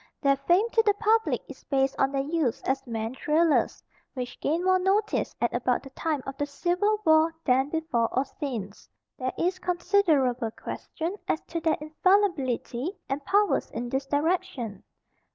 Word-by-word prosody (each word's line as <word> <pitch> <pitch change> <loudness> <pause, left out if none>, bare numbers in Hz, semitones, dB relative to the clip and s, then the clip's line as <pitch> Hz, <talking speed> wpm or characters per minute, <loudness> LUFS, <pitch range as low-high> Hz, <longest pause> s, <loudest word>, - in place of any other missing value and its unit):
Their 275 -1 +3
fame 350 +10 +2
to 450 - +4
the 415 -2 +2
public 445 +2 +2
is - - -12
based 270 -1 +1
on 270 0 +3
their 275 -1 0
use 295 -5 -1
as 270 0 -1
man 225 0 -3
trailers, 310 +4 +1 0.3
which 250 -1 -5
gained 325 +4 0
more 370 0 +4
notice 400 +3 +1
at 240 - 0
about 245 0 0
the 270 - -11
time 300 -1 -2
of 270 - -5
the 290 - +1
Civil 360 +8 +1
War 315 +1 +4
than 265 +1 +3
before 305 -8 0
or 260 +2 +1
since. 230 - -6 0.3
There 255 0 -1
is 365 +2 0
considerable 330 - +2
question 330 - -5
as 315 - +1
to 335 - -5
their 320 -1 +1
infallibility 310 - 0
and 275 +1 -2
powers 410 +2 +2
in 240 +1 -5
this 270 +2 -2
direction. 285 - -1
295 Hz, 165 wpm, -27 LUFS, 260-360 Hz, 0.3 s, to